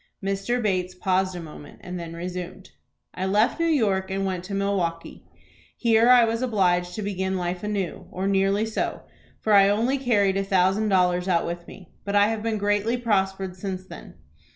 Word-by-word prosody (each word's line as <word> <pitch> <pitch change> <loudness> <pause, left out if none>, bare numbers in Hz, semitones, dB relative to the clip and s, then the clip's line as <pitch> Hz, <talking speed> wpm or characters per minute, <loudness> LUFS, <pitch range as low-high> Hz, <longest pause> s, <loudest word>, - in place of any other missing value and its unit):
Mr. 195 +5 -1
Bates 185 -4 -1
paused 185 0 0
a - - -5
moment 150 -3 -11
and 180 0 -6
then 165 -1 -7
resumed: 180 +2 -7 0.4
"I 185 +1 -3
left 210 - +2
New 335 - +2
York, 205 -12 +1
and 195 +1 -2
went 185 -2 -3
to 200 +1 -5
Milwaukie. 190 -4 -2 0.5
Here 230 0 +4
I 245 -2 +7
was 230 +1 -2
obliged 180 -7 +1
to 215 - -4
begin 190 -1 -2
life 180 0 -3
anew, 205 -4 -3
or 190 +2 -3
nearly 195 +2 +2
so, 220 - -3 0.4
for 215 - +1
I 200 -1 +7
only 235 +7 +1
carried 205 -7 +2
a 195 - 0
thousand 195 +2 +2
dollars 180 -1 +2
out 170 -3 +2
with 170 0 -5
me. 185 -4 -13
But 200 0 -3
I 205 +1 +5
have 225 -1 -2
been 225 0 -1
greatly 205 +3 0
prospered 195 -5 -1
since 185 0 -5
then. - - -12
195 Hz, 185 wpm, -24 LUFS, 180-210 Hz, 0.5 s, I